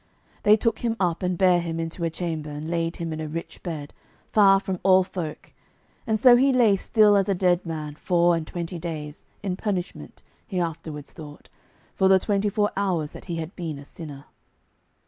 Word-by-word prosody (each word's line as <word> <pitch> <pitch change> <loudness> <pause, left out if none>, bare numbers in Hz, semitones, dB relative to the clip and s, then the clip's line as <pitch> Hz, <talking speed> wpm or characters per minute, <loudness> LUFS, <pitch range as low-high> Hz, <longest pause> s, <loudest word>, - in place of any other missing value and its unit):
They 210 +1 +6
took 225 +1 0
him 230 -2 -1
up, 175 -3 0
and 180 -1 -1
bare 180 -2 +4
him 165 -1 -4
into 165 +1 -4
a 165 - +1
chamber, 160 -2 -4
and 150 +1 -6
laid 165 0 -1
him 165 -2 -4
in 155 - -5
a 155 - -4
rich 165 +2 -7
bed, 155 -5 -6 0.4
far 195 -2 +6
from 190 -2 -4
all 190 -1 +5
folk, 175 -4 -7 0.5
and 220 -1 +1
so 240 +1 +7
he 270 +2 +4
lay 235 -6 +4
still 210 +1 +4
as 195 0 +2
a 195 - +2
dead 180 -1 +2
man 155 -2 -4
four 175 +2 +2
and 160 -2 -4
twenty 170 0 -5
days, 155 -3 -6 0.2
in 190 -3 -1
punishment, 190 -4 -4 0.2
he 185 -4 -2
afterwards 160 -3 -4
thought, 150 -2 -12 0.4
for 190 - +2
the 190 0 +6
twenty 205 +1 0
four 205 +1 0
years 180 -7 -1
that - - -11
he 170 - -4
had 165 +2 -5
been 165 -5 -5
a 140 - -11
sinner. 145 -3 -10
175 Hz, 200 wpm, -25 LUFS, 160-195 Hz, 0.5 s, so